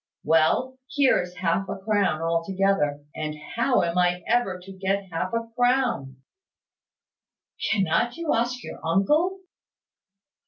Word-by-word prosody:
Well, 165 Hz, +12 st, +2 dB
here 280 Hz, -1 st, +3 dB
is 180 Hz, 0 st, -8 dB
half 185 Hz, +3 st, 0 dB
a -, -, -3 dB
crown 195 Hz, -5 st, 0 dB
altogether; 165 Hz, -3 st, 0 dB
and 155 Hz, -1 st, -3 dB, 0.2 s
how 240 Hz, 0 st, +2 dB
am 170 Hz, +1 st, 0 dB
I 180 Hz, 0 st, +1 dB
ever 215 Hz, -7 st, +1 dB
to 180 Hz, +2 st, -12 dB
get 195 Hz, 0 st, -2 dB
half 165 Hz, +3 st, -2 dB
a 230 Hz, 0 st, -2 dB
crown?" 245 Hz, -, +1 dB, 1.5 s
"Cannot 220 Hz, -, +1 dB
you 335 Hz, -2 st, 0 dB
ask 240 Hz, +1 st, -1 dB
your -, -, -8 dB
uncle?" 300 Hz, -, +2 dB
195 Hz, 125 wpm, -25 LUFS, 170-240 Hz, 1.5 s, here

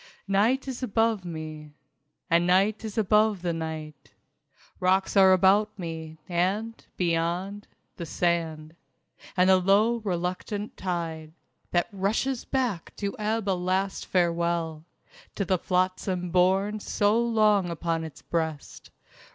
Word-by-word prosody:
II -, -, -20 dB, 0.3 s
Night 235 Hz, +8 st, +2 dB
is 265 Hz, -1 st, -5 dB
above 225 Hz, -3 st, +1 dB
me... 155 Hz, -3 st, -7 dB, 0.5 s
And 170 Hz, +1 st, +3 dB
Night 195 Hz, +5 st, +3 dB
is 220 Hz, -1 st, -6 dB
above 210 Hz, -2 st, +3 dB
the 175 Hz, -1 st, 0 dB
night. 155 Hz, -8 st, -7 dB, 0.6 s
Rocks 190 Hz, +2 st, +2 dB
are 190 Hz, -1 st, +7 dB
about 200 Hz, +3 st, +4 dB
me, 160 Hz, -3 st, -6 dB
and, 195 Hz, +6 st, -1 dB
beyond, 175 Hz, +4 st, -1 dB, 0.3 s
the 170 Hz, -, -6 dB
sand... 160 Hz, -2 st, -1 dB, 0.6 s
And 180 Hz, 0 st, +5 dB
the 190 Hz, 0 st, +6 dB
low 205 Hz, +5 st, +3 dB
reluctant 195 Hz, +1 st, -3 dB
tide, 165 Hz, -4 st, -4 dB, 0.4 s
That 175 Hz, 0 st, +1 dB
rushes 215 Hz, +6 st, -1 dB
back 245 Hz, -10 st, -2 dB
to 200 Hz, -1 st, -3 dB
ebb 215 Hz, 0 st, -1 dB
a 195 Hz, -, +3 dB
last 185 Hz, +2 st, -1 dB
farewell 170 Hz, -3 st, 0 dB, 0.5 s
To 200 Hz, -, -1 dB
the 185 Hz, 0 st, +1 dB
flotsam 185 Hz, 0 st, -1 dB
borne 190 Hz, +4 st, +2 dB
so 205 Hz, +2 st, +1 dB
long 215 Hz, -5 st, +3 dB
upon 165 Hz, 0 st, -2 dB
its 155 Hz, -2 st, -9 dB
breast. 160 Hz, -3 st, -4 dB
185 Hz, 125 wpm, -27 LUFS, 170-205 Hz, 0.6 s, are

